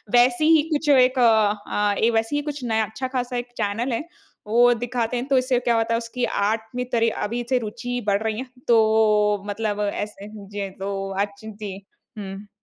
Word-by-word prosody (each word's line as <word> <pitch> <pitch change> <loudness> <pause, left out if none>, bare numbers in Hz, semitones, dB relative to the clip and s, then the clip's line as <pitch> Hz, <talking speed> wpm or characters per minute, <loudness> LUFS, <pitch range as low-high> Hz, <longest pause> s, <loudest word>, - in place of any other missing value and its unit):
वैसे 245 +5 +4
ही 320 -1 +6
कुछ 300 0 0
एक 255 -1 +5
अ, 210 -2 +2 0.2
वैसे 225 +6 0
ही 290 - +1
कुछ 285 -3 -6
नया 220 -2 +1
अच्छा-ख़ासा 250 +2 -3
एक 245 0 -4
चैनल 225 +5 -1
है 230 - -2 0.4
वो 240 +3 +5
दिखाते 240 0 -2
हैं। 245 - -2
तो 270 -2 +3
इससे 255 -1 +2
क्या 240 -1 +1
होता 225 0 +1
है - - +3
उसकी 240 +1 -3 0.2
आर्ट 220 0 0
में 250 0 -1
तरी 230 -2 +3 0.2
अभी 240 +2 -3
से 255 - +3
रूचि 245 +3 -4
बढ़ 200 +1 +2
रही 220 -1 -1
है। 260 - -4 0.2
तो 215 -3 +3
मतलब 210 0 -2
ऐसे 205 -1 -6
जी 200 -1 -6
तो 195 0 -3
अच 200 -1 -8
जी। 210 -2 -7 0.4
हुँ। 195 0 -7
225 Hz, 185 wpm, -23 LUFS, 210-245 Hz, 0.4 s, ही